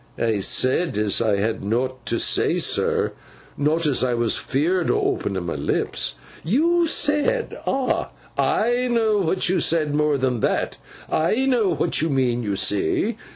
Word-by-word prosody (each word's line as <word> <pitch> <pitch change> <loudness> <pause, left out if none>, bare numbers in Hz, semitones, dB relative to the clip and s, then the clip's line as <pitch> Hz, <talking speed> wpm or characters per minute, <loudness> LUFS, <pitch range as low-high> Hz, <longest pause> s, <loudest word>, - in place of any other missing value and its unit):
'I 115 -3 0
sed 130 - +1
as 105 0 +1
I 110 -3 +2
had 110 +2 -2
nowt 120 +3 -2
to - - +1
sen, - - +1
sir; - - +1 0.4
not 155 +3 0
as 140 -4 +2
I 125 -1 +1
was 120 -1 +1
fearfo' 165 +6 0
o' - - +1
openin' 95 -3 -4
my 85 - -3
lips.' 75 0 -1 0.3
'You 330 - +2
said! 310 +11 0
Ah! 265 -1 0 0.3
I 240 +3 +1
know 225 -3 +2
what 185 +1 0
you 185 +1 +1
said; 155 -3 +1
more 150 -1 +2
than 130 -3 -1
that, - - -1 0.3
I 215 +11 +1
know 240 -7 +2
what 165 - +1
you 160 - 0
mean, 125 -4 0
you 100 -3 -2
see. 105 - 0
150 Hz, 160 wpm, -22 LUFS, -, 0.4 s, I